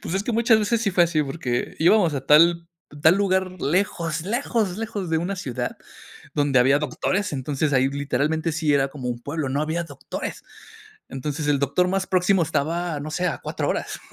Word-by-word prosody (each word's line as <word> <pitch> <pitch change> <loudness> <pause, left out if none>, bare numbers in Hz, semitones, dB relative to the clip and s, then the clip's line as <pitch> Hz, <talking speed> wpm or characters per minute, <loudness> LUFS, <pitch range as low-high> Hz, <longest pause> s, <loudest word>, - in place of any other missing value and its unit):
Pues, 175 - -4
es 195 - 0
que 240 - -2
muchas 230 0 +4
veces, 220 +2 +1
sí 200 - +1
fue 175 -1 +4
así, 165 -2 +1
porque 135 -4 -3
íbamos 170 -1 +4
a 135 -1 -4
tal 170 +2 +5 0.3
tal 160 +4 +6
lugar, 190 -2 +1
lejos, 165 -1 -1
lejos, 220 -2 -1
lejos 205 -5 -4
de 160 - +2
una 180 +4 -2
ciudad, 135 -9 -4 0.6
donde 145 -2 +2
había 135 +3 +4
doctores, 155 +6 -1
entonces, 140 +2 -1
ahí, 130 0 +3
literalmente, 145 +3 -1
sí 155 -1 0
era, 135 -1 +3
como 135 -3 -5
un 120 -1 -5
pueblo, 145 +2 -3
no 140 +3 0
había 160 +3 -1
doctores. 140 -5 -7 0.7
Entonces, 145 +3 -4
el 145 -2 +2
doctor 140 +6 +1
más 190 0 -1
próximo, 185 0 +2
estaba, 165 +1 -2
no 155 +1 -6
sé, 180 +3 0
a 165 - -2
4 - - -3
horas, - - -3
160 Hz, 190 wpm, -23 LUFS, 145-185 Hz, 0.7 s, tal